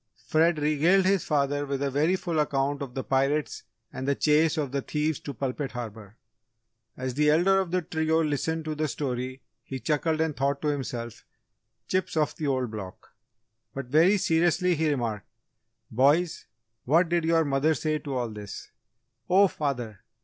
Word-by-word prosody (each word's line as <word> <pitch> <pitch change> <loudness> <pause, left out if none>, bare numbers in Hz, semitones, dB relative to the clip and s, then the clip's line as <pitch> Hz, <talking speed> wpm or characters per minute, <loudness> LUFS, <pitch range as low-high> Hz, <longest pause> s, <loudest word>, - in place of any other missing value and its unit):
Fred 165 +1 +3
regaled 155 +6 +3
his 195 -2 +2
father 145 -1 0
with 140 0 -2
a 140 - -1
very 155 +7 +2
full 170 -4 -2
account 140 -1 0
of 130 -3 -6
the 130 - -2
pirates 135 +1 0 0.3
and 130 +1 -5
the 140 - +2
chase 155 +3 +3
of 145 -4 -1
the 140 0 -1
thieves 150 +1 -1
to 145 - -6
Pulpit 135 +1 -4
Harbour. 110 -3 -8 0.8
As 130 0 -3
the 150 +3 +2
elder 180 +5 +4
of 190 -2 -1
the 180 0 0
trio 160 +1 0
listened 155 +2 -1
to 155 - -2
the 155 +1 -1
story 130 -1 -4 0.2
he 130 - -6
chuckled 155 +2 0
and 160 -2 0
thought 140 +1 0
to 150 - +1
himself, 120 -5 -4 0.6
"Chips 185 -3 -1
of 150 -1 +1
the 155 - -2
Old 130 -4 0
Block." 100 -4 -8 0.7
But, 135 -2 -5
very 165 +8 +5
seriously 175 +1 +2
he 160 -1 +1
remarked, 115 -7 -2 0.6
"Boys, 145 +8 +2 0.4
what 165 +7 +4
did 170 0 +1
your 165 0 +3
mother 145 +3 +2
say 155 +3 -1
to 140 -3 -5
all 120 -2 -1
this?" 105 -2 -9 0.6
"Oh, 195 +2 +6
father! 125 - -3
150 Hz, 170 wpm, -27 LUFS, 130-160 Hz, 0.8 s, Oh